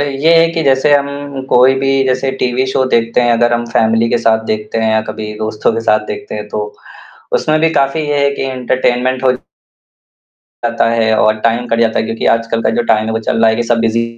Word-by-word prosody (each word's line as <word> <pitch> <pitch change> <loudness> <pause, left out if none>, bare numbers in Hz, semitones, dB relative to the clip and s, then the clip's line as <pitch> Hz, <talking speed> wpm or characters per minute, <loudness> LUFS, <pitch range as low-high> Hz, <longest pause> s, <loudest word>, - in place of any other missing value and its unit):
ये 145 +3 +1
है 165 - +4
कि 165 -1 -1
जैसे 135 +2 +3
हम 140 0 +1 0.4
कोई 130 +2 +4
भी 135 0 +1
जैसे 130 +1 0
टीवी 125 +1 0
शो 130 0 0
देखते 115 +1 +1
हैं 120 -1 +2
अगर 120 +1 +2
हम 120 0 0
फैमिली 115 0 +2
के - - +1
साथ 110 -1 +1
देखते 110 +1 -3
हैं 110 0 +1
या 110 - +2
कभी 110 -1 -6
दोस्तों 110 +1 -1
के 115 - -2
साथ 110 -1 +2
देखते 415 0 -6
हैं - - -6
तो, 435 0 -5 0.6
उसमे 155 - +1
भी 165 +1 +2
काफ़ी 140 +2 +1
ये 145 -1 0
है 140 - +3
कि - - -4
एंटरटेनमेंट 130 0 -1
हो 130 - +4 1.1
जाता 115 -1 -2
है 110 -1 +1
और 110 0 +2
टाइम 115 +2 0
कट 115 0 0
जाता 115 -1 +1
है 110 - 0
क्योंकि 115 0 -3
आजकल 115 0 -3
का - - +1
जो - - +2
टाइम 110 0 0
है 110 - -2
वो 110 - -1
चल 115 0 -2
रहा 115 - +5
है 110 - -1
कि 120 - 0
सब 120 0 0
बीजी 115 0 +1
120 Hz, 235 wpm, -14 LUFS, 115-135 Hz, 1.1 s, रहा